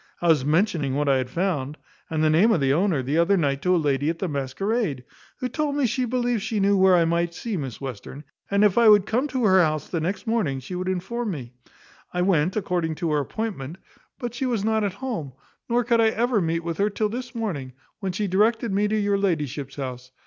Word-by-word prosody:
I 175 - +1
was 155 -5 +4
mentioning 155 -3 +1
what 145 0 0
I 135 -1 +4
had 130 -1 -2
found, 150 -3 -2 0.3
and 155 -1 0
the 155 - +4
name 190 +9 +5
of 180 - +3
the 135 -1 +2
owner, 165 -4 +1
the 145 +6 0
other 190 +4 +3
night 140 -4 0
to 180 +3 +2
a - - +3
lady 145 -2 +1
at 165 - -2
the 190 - -2
masquerade, 145 - -2 0.3
who 255 - -2
told 290 +3 -2
me 285 -2 +2
she 250 +2 0
believed 245 -2 0
she 215 +2 -2
knew 200 +1 +3
where 190 -1 +5
I 170 -1 +4
might 170 +1 0
see 225 +2 -4
Miss 135 -8 -5
Western; 135 +2 -7 0.3
and 200 +1 +3
if 210 +1 +4
I 230 -2 +7
would 205 -2 +6
come 250 +7 0
to 260 -4 -1
her 190 -2 +6
house 155 -2 0
the 165 - -2
next 185 +8 -3
morning 210 - 0
she 130 +7 -9
would 185 +1 -2
inform 200 +6 -2
me, 130 -9 -6 0.6
I 180 - +1
went 180 -2 +2
according 175 -6 -1
to 165 0 -2
her 150 - +2
appointment, 170 - -4 0.4
but 245 -3 -5
she 260 +2 -2
was 225 -5 -1
not 220 -1 +1
at 200 -3 -1
home; 165 - -4 0.4
nor 240 +1 +2
could 235 -1 +3
I 225 - +5
ever 230 0 +1
meet 165 0 -1
with 170 0 -4
her 205 +1 +3
till 210 +1 -1
this 250 +3 -6
morning, 160 - -4 0.3
when 195 -3 -2
she 205 +4 -2
directed 215 +3 +1
me 205 +2 +2
to 215 +1 0
your 205 -1 +1
ladyship's 150 -7 -2
house. 130 -2 -6
185 Hz, 235 wpm, -24 LUFS, 150-220 Hz, 0.6 s, I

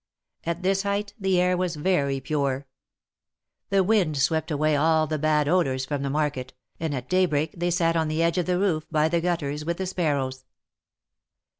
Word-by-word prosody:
At 170 +2 -2
this 195 +1 +2
height 200 +1 -2
the 190 -2 +2
air 180 0 +3
was 180 -2 -1
very 145 -4 0
pure. 140 -1 -1 1.0
The 195 -1 +3
wind 185 -7 +2
swept 160 +3 +1
away 155 0 +1
all 160 +2 +3
the 155 0 -3
bad 150 -1 +2
odors 135 -6 +1
from 145 0 -3
the 140 - -2
market, 140 -3 -2 0.3
and 160 -3 -2
at 125 -1 -5
daybreak 165 -5 +1
they 175 0 -1
sat 165 -1 +1
on 160 -1 +1
the 155 +2 0
edge 170 +2 +1
of 175 - -2
the 180 -1 +1
roof, 180 -5 +1
by 155 -1 +2
the 170 0 +1
gutters, 150 -4 -2
with 170 +2 -2
the 190 - -2
sparrows. 140 -8 -2
160 Hz, 185 wpm, -25 LUFS, 145-180 Hz, 1.0 s, air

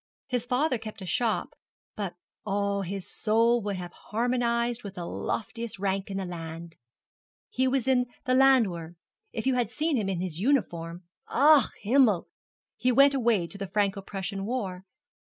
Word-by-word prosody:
His 245 -2 -2
father 255 0 +1
kept 215 -2 -8
a - - -6
shop, 225 +4 0 0.4
but, 195 -4 -4 0.3
oh, 200 -1 0
his 195 0 -5
soul 230 +2 +2
would 205 -1 -2
have 175 -1 -7
harmonized 235 +1 0
with 200 -2 -7
the 175 - -5
loftiest 230 +4 -4
rank 195 0 -1
in 195 - -3
the 195 - -2
land. 165 -1 -7 0.8
He 260 +1 +1
was 260 -1 0
in 250 -2 +3 0.2
the 255 - +2
Landwehr. 220 -11 +3 0.4
If 225 - -4
you 265 - +3
had 245 -2 +1
seen 310 -2 0
him 205 -4 -1
in 185 -3 -1
his 175 -3 -4
uniform 175 -9 0 0.3
ach, 285 -1 +6 0.2
Himmel! 220 -4 +3 0.5
He 255 - +2
went 275 +3 +6
away 235 -9 +2
to 200 +4 -6
the 195 - -3
Franco 200 0 0
Prussian 195 0 -4
war. 195 -7 -3
215 Hz, 165 wpm, -28 LUFS, 190-250 Hz, 0.8 s, ach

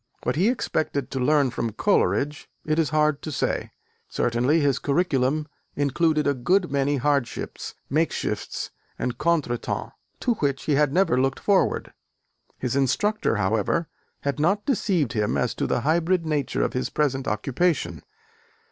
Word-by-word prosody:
What 125 - 0
he 185 +8 +3
expected 155 - -1
to 135 - -2
learn 140 0 +3
from 115 -2 -3
Coleridge, 135 +9 +1 0.2
it 155 +1 +1
is 160 - +2
hard 150 -1 +2
to 155 - -5
say: - - -1 0.4
certainly 125 +7 +1
his 140 -3 +2
curriculum 145 -1 +1 0.3
included 150 +2 +1
a 145 - +3
good 175 +7 +1
many 140 +1 +1
hardships, 140 -1 -2
makeshifts 160 +4 -2 0.3
and 125 -1 -3
contretemps 150 -7 -1 0.3
to 245 - +2
which 140 -9 -1
he 150 - 0
had 145 0 +3
never 165 -6 +3
looked 135 0 0
forward. 200 -2 +1 0.6
His 125 0 -2
instructor, 170 - +1
however, 110 - 0 0.3
had 140 +1 -2
not 195 +7 +1
deceived 185 - +1
him 105 -2 0
as - - 0
to - - -2
the - - 0
hybrid 170 +3 +1
nature 150 -4 0
of - - -1
his 125 - -1
present 135 -3 0
occupation. 110 - 0
145 Hz, 145 wpm, -25 LUFS, 130-165 Hz, 0.6 s, he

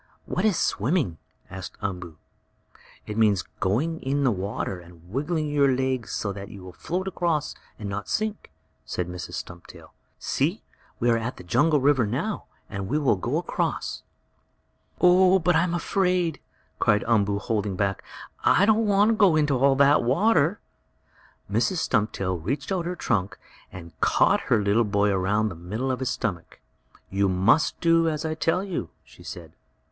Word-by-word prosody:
"What 185 - -1
is 210 -5 +3
swimming?" 110 - 0 0.3
asked 95 -1 -8
Umboo. 90 -5 -5 0.9
"It 105 +1 -4
means 105 -5 +3 0.2
going 135 - 0
in 140 +2 0
the 130 - +3
water, 95 -1 -3
and 85 -1 -16
wiggling 150 +5 -1
your 145 -2 +3
legs 130 -3 -1
so 100 -2 -2
that 100 0 -8
you 100 -3 -11
will 90 -1 -10
float 185 - -3
across 170 -5 -1 0.2
and 105 - -6
not 100 +1 -5
sink," 215 -1 -2 0.3
said 90 - -3
Mrs. 90 0 -7
Stumptail. 85 0 -10 0.2
"See, - - -1 0.4
we 120 - 0
are 115 - +2
at 115 +3 -4
the - - -10
jungle 145 - +3
river 135 -4 +3
now, 145 - -3 0.2
and 100 -1 -5
we 145 - 0
will 140 -7 +3
go 95 - -2
across." - - -2 1.0
"Oh, 185 +1 +6
but 180 -1 +2
I'm 170 +1 +2
afraid!" 180 -4 0 0.4
cried 105 - +3
Umboo, 105 -3 +2
holding 105 -2 -2
back. 95 0 -1 0.4
"I 200 - +5
don't 220 +1 +3
want 205 +1 +4
to - - +2
go 200 -6 +4
in 150 -1 +3
all 135 +1 +3
that 140 +2 +5
water." 170 - +2 0.9
Mrs. 115 - 0
Stumptail 100 - 0
reached 135 - -3
out 180 -3 -1
her 180 - -3
trunk 100 - -1 0.3
and 85 -2 -10
caught - - +3
her 110 -3 +3
little 100 +4 +3
boy 105 -1 +1
around 105 +3 +1
the 90 - -8
middle 105 +11 -3
of 130 - -2
his 130 - -1
stomach. 90 -7 -4 0.5
"You 100 0 +2
must 95 - +2
do 165 -1 +4
as 155 0 -3
I 160 - -1
tell 165 +3 0
you!" 180 - -4
she - - -18
said. - - -9
125 Hz, 165 wpm, -25 LUFS, 100-165 Hz, 1.0 s, Oh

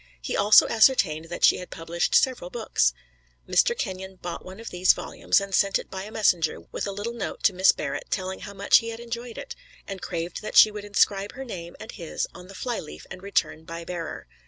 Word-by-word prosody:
He - - -4
also 205 +2 +7
ascertained 200 - +3
that 175 - -7
she - - +5
had 180 - -8
published 165 +1 -2
several 260 - +2
books. 485 -1 +1 0.6
Mr. 475 - +3
Kenyon 190 -3 -5
bought 175 -1 -6
one 185 +2 -10
of 230 - -8
these 180 +1 +4
volumes - - 0
and 200 0 -6
sent 195 +1 +3
it - - -10
by 190 0 -5
a 215 - -10
messenger 180 -7 +1
with - - -3
a - - -2
little 205 +4 -4
note 235 - -5
to 200 - +4
Miss 185 +1 +6
Barrett - - -5
telling 190 -1 -3
how 200 - -8
much 200 +1 +5
he 230 - -6
had 225 0 -6
enjoyed 235 0 -6
it, 475 -1 -7 0.3
and 195 -1 -6
craved 170 +1 -4
that 215 - -3
she 215 - +9
would 210 -1 -7
inscribe 200 -1 +1
her 270 - -7
name 170 -7 -7
and 220 - -8
his 170 -6 -4
on 180 - -12
the 195 - -12
fly 240 +3 -3
leaf 75 +1 -10
and 180 - -8
return 195 -5 -1
by 165 0 -7
bearer. 170 -2 -5
195 Hz, 225 wpm, -25 LUFS, 180-220 Hz, 0.6 s, she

